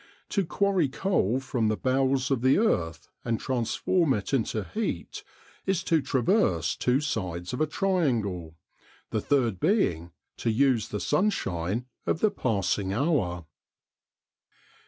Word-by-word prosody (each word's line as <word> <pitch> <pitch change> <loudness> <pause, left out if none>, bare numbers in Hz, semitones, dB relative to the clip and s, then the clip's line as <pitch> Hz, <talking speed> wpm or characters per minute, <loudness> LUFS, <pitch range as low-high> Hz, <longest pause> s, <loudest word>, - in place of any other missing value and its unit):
To 200 - +1
quarry 185 -3 +1
coal 130 - +1
from 125 -4 -1
the 110 0 0
bowels 130 0 +1
of 130 -4 +1
the 130 +2 +4
earth 85 - 0 0.2
and 115 -2 -1
transform 135 +5 +1
it 105 +6 -4
into 110 -4 0
heat, 220 - -4 0.4
is 190 -2 +1
to 165 -3 +2
traverse 125 - +1
two 125 +3 +1
sides 90 - -3
of 125 - -2
a 155 - +3
triangle, 115 - 0 0.6
the 110 - 0
third 120 -9 +1
being 90 - +1 0.3
to - - -1
use 120 0 +2
the 105 - -4
sunshine 115 - 0 0.2
of - - +1
the 215 +1 +3
passing 100 - 0
hour. 100 - 0
125 Hz, 135 wpm, -27 LUFS, 100-155 Hz, 0.6 s, the